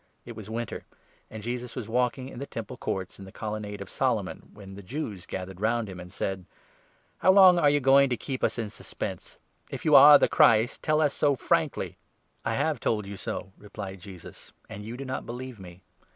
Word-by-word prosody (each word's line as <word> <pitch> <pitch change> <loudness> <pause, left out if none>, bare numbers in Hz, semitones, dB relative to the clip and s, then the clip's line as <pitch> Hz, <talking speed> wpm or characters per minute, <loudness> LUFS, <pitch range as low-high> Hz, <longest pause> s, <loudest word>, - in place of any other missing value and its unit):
It 120 - -9
was 110 -1 -9
winter; 115 +1 -4 0.5
and 110 -1 -8
Jesus 120 +1 -4
Festival. 130 - -3
was 110 - -11
Walking 125 +1 -2
in 120 - -9
the 140 - -5
Temple 115 +2 -6
Courts, 95 -6 -4
in 95 - -9
the 95 - -12
Colon 110 +1 -5
nade 105 -1 -7
of - - -8
Solomon, - - -1
when 100 -2 -12
the 100 - -9
Jews 105 - -6
gathered 95 0 -6
round 115 +1 +1
him, 95 -2 -8
and 90 0 -10
said: 95 -1 -4 0.4
" - - -37
How 185 - +5
long 190 -2 +7
are 145 - +5
you 145 0 +3
going 135 0 +5
to 125 - -1
keep 130 +2 -5
us - - +1
in 110 -3 -3
suspense? - - -7 0.3
If - - -7
you 155 - +3
are 145 +1 +10
the - - +3
Christ, 115 +1 +4
tell 155 0 +2
us 145 -2 +2
so 145 -1 +2
frankly." - - -1 0.2
" - - -43
I - - 0
have - - 0
told 105 -3 -1
you 100 +1 -7
so," 95 +1 -5
replied 100 -2 -8
Jesus, 95 -3 -12
" - - -35
and 105 - -7
you 115 +3 -7
do 135 - -6
not 130 0 -5
believe 125 -1 -7
me. 90 -1 -12
115 Hz, 225 wpm, -27 LUFS, 100-130 Hz, 0.5 s, are